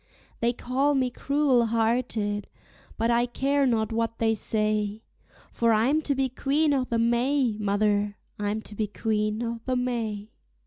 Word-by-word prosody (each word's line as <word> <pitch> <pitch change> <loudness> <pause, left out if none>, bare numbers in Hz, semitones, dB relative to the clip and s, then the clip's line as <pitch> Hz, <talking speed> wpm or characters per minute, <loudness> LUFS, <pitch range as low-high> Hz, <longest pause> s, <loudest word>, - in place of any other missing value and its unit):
They 235 +1 +2
call 265 +4 0
me 255 -2 +1
cruel 275 -3 +2
hearted, 225 -2 0 0.5
but 230 +1 +1
I 240 +1 +2
care 275 +3 +1
not 225 -2 +1
what 230 0 -1
they 225 -1 +2
say, 215 0 -1 0.5
For 230 -1 +2
I'm 255 +9 +3
to 285 -2 0
be 265 0 +1
Queen 285 +4 +1
o' 265 -2 +1
the 235 - -1
May, 240 +1 +2
mother, 205 0 +1 0.2
I'm 210 +1 -2
to - - -10
be 210 0 -2
Queen 215 +1 -1
o' 230 -1 -4
the 255 - 0
May. 225 -4 -2
230 Hz, 160 wpm, -26 LUFS, 215-255 Hz, 0.5 s, I'm